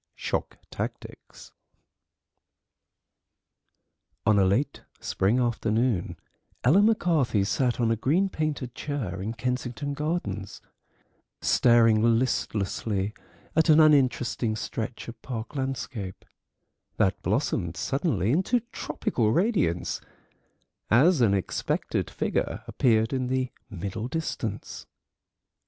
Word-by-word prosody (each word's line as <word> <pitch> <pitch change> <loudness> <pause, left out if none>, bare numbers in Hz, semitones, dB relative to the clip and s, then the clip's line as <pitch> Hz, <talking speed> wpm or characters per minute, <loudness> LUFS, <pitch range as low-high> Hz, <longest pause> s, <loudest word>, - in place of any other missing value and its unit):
SHOCK - - -3
TACTICS - - -7 2.7
On 105 -2 +4
a - - +5
late 125 +10 0 0.2
spring 105 +7 +1
afternoon 115 -3 0 0.5
Ella 155 +11 +5
McCarthy 165 - +2
sat 125 +5 0
on 115 -2 +2
a - - +3
green 155 - +2
painted 155 -8 -3
chair 120 - -4
in 110 +4 -4
Kensington 125 +2 -3
Gardens, 140 - -3 0.8
staring 115 -2 +4 0.2
listlessly 105 -4 -1 0.4
at 160 +1 +3
an 155 0 +7
uninteresting 130 -6 +3
stretch 115 +2 -5
of 115 - -9
park 115 +1 -6
landscape, 125 -7 -4 0.7
that - - +1
blossomed 85 +1 -1
suddenly 135 - 0
into 190 - +2
tropical 120 - -1
radiance 170 - +1 0.9
as 140 - +5
an 100 -4 +4
expected 95 - -2
figure - - -2
appeared 115 0 +2
in 130 -1 -1
the 130 0 -1 0.2
middle 100 +3 -4
distance. 125 -8 -4
120 Hz, 100 wpm, -27 LUFS, 110-145 Hz, 2.7 s, an